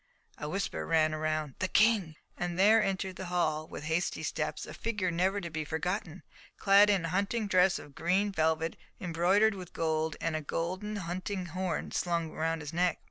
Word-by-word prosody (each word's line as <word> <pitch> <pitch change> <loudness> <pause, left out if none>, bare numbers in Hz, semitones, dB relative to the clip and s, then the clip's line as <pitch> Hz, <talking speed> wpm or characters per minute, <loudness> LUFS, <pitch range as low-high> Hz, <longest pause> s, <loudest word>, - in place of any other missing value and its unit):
a 150 - -4
whisper 195 +4 -2
ran 155 -1 +3
round, 155 -2 -1
"the 185 - +1
King," 210 -7 +3 0.2
and 175 0 -3
there 215 +4 +6
entered 190 -2 -2
the 190 - -5
hall 160 -3 0
with - - -8
hasty 160 +3 -1
steps, - - -2
a - - -9
figure 210 -6 -1
never 185 +4 +1
to 170 -3 -6
be 155 0 -2
forgotten, 175 +3 -3 0.3
clad 200 +1 +6
in 195 -5 +2
a - - -2
hunting 200 +5 0
dress 185 -2 +4
of 145 - -11
green 190 +7 +1
velvet 160 -2 +1 0.2
embroidered 185 +5 +3
with 185 -3 -9
gold, 160 -1 -1
with 165 - -1
a 155 - -1
golden 185 +8 -3
hunting 185 0 -3
horn 180 0 -3
slung 170 -2 -1
round 165 0 -1
his 150 +2 -7
neck. 180 +1 +2
175 Hz, 185 wpm, -31 LUFS, 160-195 Hz, 0.3 s, there